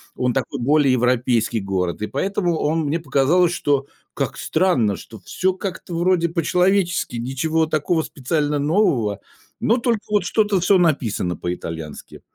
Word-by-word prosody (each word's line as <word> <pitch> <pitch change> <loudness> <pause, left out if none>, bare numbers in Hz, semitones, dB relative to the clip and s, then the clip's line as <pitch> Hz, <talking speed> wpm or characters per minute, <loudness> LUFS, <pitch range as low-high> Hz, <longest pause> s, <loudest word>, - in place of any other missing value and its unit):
он 125 -1 0
такой 135 +2 -2
более 140 +2 +3
европейский 125 -2 +1
город, 95 -2 -2
и 105 - -1
поэтому 175 - -1
он 160 +2 0
мне 155 +4 0
показалось, 165 +4 +2
что 140 -5 0 0.3
как - - -2
странно, 145 - +1
что 110 -2 -12
всё 185 - -1
как-то 185 -2 -6
вроде 170 0 +2
по-человечески, 180 0 +1
ничего 155 +6 0
такого 155 +2 0
специально 145 +2 -1
нового, 140 - +1 0.4
но 230 - +3
только 235 -3 0
вот 210 -3 +1
что-то 210 -1 +1
всё 190 +2 +4
написано 120 - 0
по-итальянски. 80 -3 -6
155 Hz, 140 wpm, -21 LUFS, 125-180 Hz, 0.4 s, всё